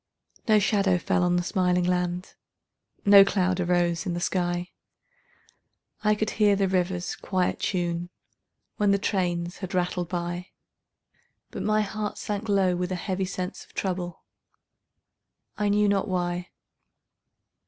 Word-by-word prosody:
No 215 Hz, -1 st, +6 dB
shadow 200 Hz, -2 st, +2 dB
fell 180 Hz, -, 0 dB
on 175 Hz, 0 st, +2 dB
the 175 Hz, -, +1 dB
smiling 180 Hz, -1 st, +1 dB
land, 180 Hz, 0 st, -1 dB, 0.7 s
No 200 Hz, -1 st, +9 dB
cloud 185 Hz, -2 st, +1 dB
arose 175 Hz, 0 st, +1 dB
in 175 Hz, -, -1 dB
the -, -, -2 dB
sky; 175 Hz, 0 st, -1 dB, 1.3 s
I 210 Hz, 0 st, +4 dB
could 215 Hz, 0 st, -1 dB
hear 210 Hz, -2 st, +3 dB
the 195 Hz, -1 st, +1 dB
river's 180 Hz, -1 st, -1 dB
quiet 185 Hz, -2 st, -1 dB
tune 175 Hz, -2 st, -1 dB, 0.7 s
When 205 Hz, -1 st, +2 dB
the 200 Hz, -, +4 dB
trains 175 Hz, -3 st, -1 dB
had 190 Hz, -1 st, -5 dB
rattled 180 Hz, -1 st, -1 dB
by; 175 Hz, 0 st, -3 dB, 1.0 s
But -, -, -5 dB
my 215 Hz, 0 st, +2 dB
heart 210 Hz, 0 st, -3 dB
sank 210 Hz, +1 st, -4 dB
low 190 Hz, -3 st, +3 dB
with 180 Hz, +1 st, -2 dB
a -, -, 0 dB
heavy 190 Hz, +1 st, -2 dB
sense 185 Hz, 0 st, -5 dB
Of -, -, -23 dB
trouble, 180 Hz, -2 st, -3 dB, 1.3 s
I 210 Hz, -1 st, 0 dB
knew 205 Hz, +1 st, +3 dB
not 200 Hz, +1 st, +1 dB
why. 175 Hz, -1 st, -2 dB
185 Hz, 140 wpm, -26 LUFS, 175-200 Hz, 1.3 s, No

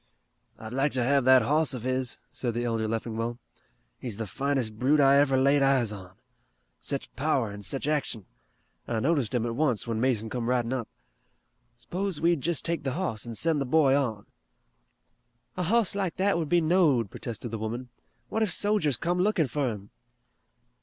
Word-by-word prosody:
"I'd 110 Hz, +1 st, -8 dB
like 135 Hz, +3 st, +1 dB
to 130 Hz, -2 st, 0 dB
have 140 Hz, +1 st, +2 dB
that 130 Hz, 0 st, +7 dB
hoss 150 Hz, -1 st, +2 dB
of 120 Hz, -, -7 dB
his," 130 Hz, -1 st, -1 dB
said 120 Hz, -3 st, -3 dB
the 120 Hz, -, -1 dB
elder 115 Hz, -2 st, -1 dB
Leffingwell. 115 Hz, +1 st, -3 dB, 0.6 s
"He's 115 Hz, -6 st, -6 dB
the 115 Hz, -, -3 dB
finest 125 Hz, -1 st, -2 dB
brute 140 Hz, +4 st, +3 dB
I 140 Hz, 0 st, +6 dB
ever 140 Hz, -2 st, +3 dB
laid 140 Hz, +2 st, +4 dB
eyes 135 Hz, -5 st, +3 dB
on. 95 Hz, -3 st, -10 dB, 0.6 s
Sech 140 Hz, -2 st, -5 dB
power 135 Hz, -6 st, 0 dB
an' 100 Hz, 0 st, -8 dB
sech 135 Hz, +7 st, -4 dB
action. 145 Hz, -9 st, -2 dB, 0.6 s
I 115 Hz, -, -1 dB
noticed 135 Hz, -3 st, 0 dB
him 120 Hz, -1 st, 0 dB
at 115 Hz, -1 st, -3 dB
once, 130 Hz, -6 st, 0 dB
when 115 Hz, -2 st, -2 dB
Mason 120 Hz, -4 st, +1 dB
come 120 Hz, 0 st, -3 dB
ridin' 125 Hz, -1 st, 0 dB
up. 125 Hz, -4 st, -3 dB, 0.9 s
S'pose 175 Hz, +8 st, -4 dB
we 170 Hz, +1 st, +3 dB
jest 165 Hz, +2 st, -1 dB
take 170 Hz, -1 st, 0 dB
the 135 Hz, -2 st, -2 dB
hoss 150 Hz, -, -2 dB
and 115 Hz, -2 st, -6 dB
send 160 Hz, -3 st, +1 dB
the -, -, -1 dB
boy 140 Hz, 0 st, +4 dB
on." 115 Hz, -7 st, -1 dB, 1.3 s
"A 180 Hz, -, -3 dB
hoss 210 Hz, +3 st, +3 dB
like 195 Hz, -4 st, -2 dB
that 195 Hz, +1 st, +1 dB
would 165 Hz, -3 st, -2 dB
be 175 Hz, +1 st, +4 dB
knowed," 155 Hz, -, +2 dB
protested 120 Hz, 0 st, -6 dB
the 115 Hz, -, -4 dB
woman. 120 Hz, +3 st, -4 dB, 0.4 s
"What 220 Hz, -, -2 dB
if 215 Hz, -4 st, +2 dB
sojers 205 Hz, -, +2 dB
come 175 Hz, +6 st, -1 dB
lookin' 185 Hz, -4 st, +2 dB
fur 140 Hz, 0 st, -1 dB
him!" 100 Hz, -2 st, -9 dB
130 Hz, 185 wpm, -27 LUFS, 115-155 Hz, 1.3 s, that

